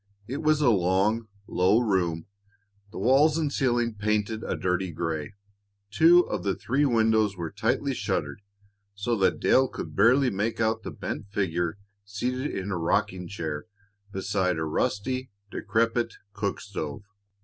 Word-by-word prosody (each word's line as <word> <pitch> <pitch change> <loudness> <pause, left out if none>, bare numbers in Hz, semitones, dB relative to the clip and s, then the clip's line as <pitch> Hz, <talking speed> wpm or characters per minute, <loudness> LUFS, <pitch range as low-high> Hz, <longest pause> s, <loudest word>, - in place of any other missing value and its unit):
It 135 +4 -4
was 155 -1 +3
a 130 -5 +5
long, 100 +4 +2 0.2
low 95 +3 +3
room, 90 -8 0 0.7
the - - -9
walls 145 +5 +4
and 150 -3 -1
ceiling 120 -3 +1
painted 105 +1 -1
a - - -2
dirty 90 0 -1
gray. 80 +1 -3 0.6
Two 165 +9 +7
of - - -2
the 100 -1 0
three 140 +5 0
windows 110 -5 +2
were 85 -2 -4
tightly 115 +6 0
shuttered, 100 - -2 0.5
so 110 +4 -1
that 95 -5 +2
Dale 130 0 +4
could - - -7
barely 125 +5 +4
make 105 +4 -2
out 110 0 +1
the - - -6
bent - - -5
figure 90 -3 -1 0.3
seated 125 +7 -3
in 95 +1 -4
a 90 - -1
rocking 90 +2 0
chair 80 -7 -4 0.5
beside 95 -2 0
a 80 - -1
rusty, 130 +11 -1 0.2
decrepit 115 +2 0 0.2
cook 100 -2 -2
stove. 90 -5 -5
105 Hz, 150 wpm, -27 LUFS, 95-120 Hz, 0.7 s, Two